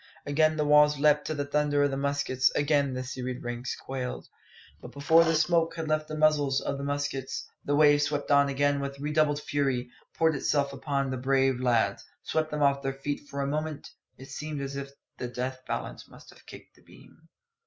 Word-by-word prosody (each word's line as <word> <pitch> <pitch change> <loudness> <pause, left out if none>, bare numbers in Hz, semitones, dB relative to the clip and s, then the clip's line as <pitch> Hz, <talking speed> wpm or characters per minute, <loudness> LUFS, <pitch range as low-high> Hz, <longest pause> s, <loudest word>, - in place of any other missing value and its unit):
Again 155 +2 +2
the 150 - +1
walls 150 0 +5
leapt 150 0 +3
to 155 - -2
the 145 -1 -2
thunder 145 0 +1
of 145 - +1
the - - -2
muskets; 140 -2 +1
again 145 -2 +1
the 130 - -3
serried 130 0 -5
ranks 120 +1 -4
quailed. 130 -2 -6 0.5
But - - -11
before 160 +4 +4
the 165 0 +1
smoke 165 0 +2
had 165 -1 -4
left 155 0 0
the 155 - -5
muzzles 145 -3 +3
of 140 - -3
the - - -5
muskets, 145 -2 -3 0.2
the 145 - +1
wave 145 -1 +5
swept 145 0 -1
on 140 0 +5
again 145 +1 +1
with 140 0 -5
redoubled 150 0 +1
fury, 135 -5 -1 0.3
poured 160 -1 +3
itself 140 0 0
upon 140 0 -2
and 135 - -2
around - - -4
the 130 -1 -5
brave 135 -1 +2
lads, 120 -3 +1 0.2
swept 155 0 -1
them 150 -1 -1
off 140 0 +3
their 135 -1 -2
feet 145 +1 -5
For 140 - -4
a - - -1
moment 155 +1 -4 0.3
it 135 +1 -12
seemed 150 0 -5
as 140 0 -5
if 140 0 -5 0.3
the 125 - -3
death 130 +1 -4
balance - - -5
must - - -15
kick - - -13
the - - -24
beam. - - -19
145 Hz, 205 wpm, -28 LUFS, 135-150 Hz, 0.5 s, walls